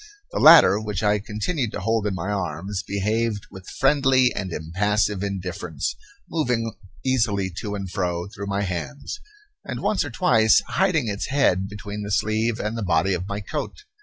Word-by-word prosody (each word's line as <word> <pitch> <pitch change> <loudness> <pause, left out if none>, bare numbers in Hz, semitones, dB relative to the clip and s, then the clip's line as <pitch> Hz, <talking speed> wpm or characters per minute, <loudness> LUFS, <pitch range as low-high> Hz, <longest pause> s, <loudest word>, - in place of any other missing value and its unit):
The - - -2
latter, 100 - +8
which 105 -2 -3
I 105 0 +3
continued 110 - -2
to - - -3
hold 110 +1 0
in 100 - -2
my 95 +3 -3
arms, 95 +1 -3
behaved 105 +2 -1
with 95 -1 -11
friendly 135 -3 +3
and 95 -3 -4
impassive 100 +5 0
indifference, 95 -5 -3 0.3
moving 125 -8 -1 0.3
easily 110 -7 +1
to 105 -1 -4
and 100 -1 -4
fro 90 -1 -2
through 100 0 -7
my 100 0 -1
hands, 75 -8 -5 0.4
and - - -5
once 210 - +1
or 145 - -5
twice 110 -2 +4
hiding 180 -9 +1
its 100 -1 -3
head 110 -9 +2
between 105 0 -6
the 100 - -5
sleeve 110 +2 0
and 105 +2 -2
the 115 - -3
body 90 0 +2
of 90 +1 -3
my 100 +1 -4
coat. 150 - -5
105 Hz, 170 wpm, -23 LUFS, 95-115 Hz, 0.4 s, latter